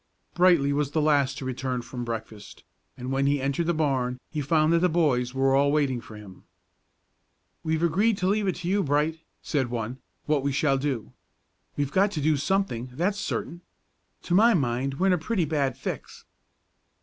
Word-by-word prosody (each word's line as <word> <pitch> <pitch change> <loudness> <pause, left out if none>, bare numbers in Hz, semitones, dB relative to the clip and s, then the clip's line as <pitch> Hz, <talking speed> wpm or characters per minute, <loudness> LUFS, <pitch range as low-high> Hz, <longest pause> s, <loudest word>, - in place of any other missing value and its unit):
Brightly 175 -6 +4
was 145 -1 0
the 160 - +2
last 145 -3 +2
to 140 - -6
return 130 -1 -3
from 120 +1 -6
breakfast, 110 -3 -7 0.3
and 125 +1 -5
when 135 +1 +1
he 145 0 +2
entered 140 +5 -1
the 175 - +2
barn 130 -5 0
he 155 - -2
found 155 +2 +2
that 170 - +4
the 180 +1 +3
boys 135 -7 +1
were 135 0 +2
all 140 +1 +3
waiting 140 -5 +1
for 110 - -12
him. 100 -3 -12 1.2
"We've 160 +1 0
agreed 195 +6 +2
to 185 - -1
leave 205 +1 +1
it 185 - 0
to 175 0 -6
you, 200 +2 +2
Bright," 150 +1 0 0.2
said 135 -5 -1
one, 120 +2 -4 0.3
"what 150 -2 +1
we 140 +1 -1
shall 135 0 +1
do. 130 - -3 0.6
We've 145 -1 -1
got 195 +4 +3
to 155 - -2
do 155 +1 +2
something, 150 -5 -1
that's 190 +9 -1
certain. 175 -3 -4 0.6
To 175 - -2
my 220 +4 +6
mind 135 -2 -1
we're 185 - 0
in 190 - +4
a 180 - +1
pretty 185 +1 0
bad 140 -4 -1
fix." - - -6
145 Hz, 190 wpm, -26 LUFS, 130-170 Hz, 1.2 s, my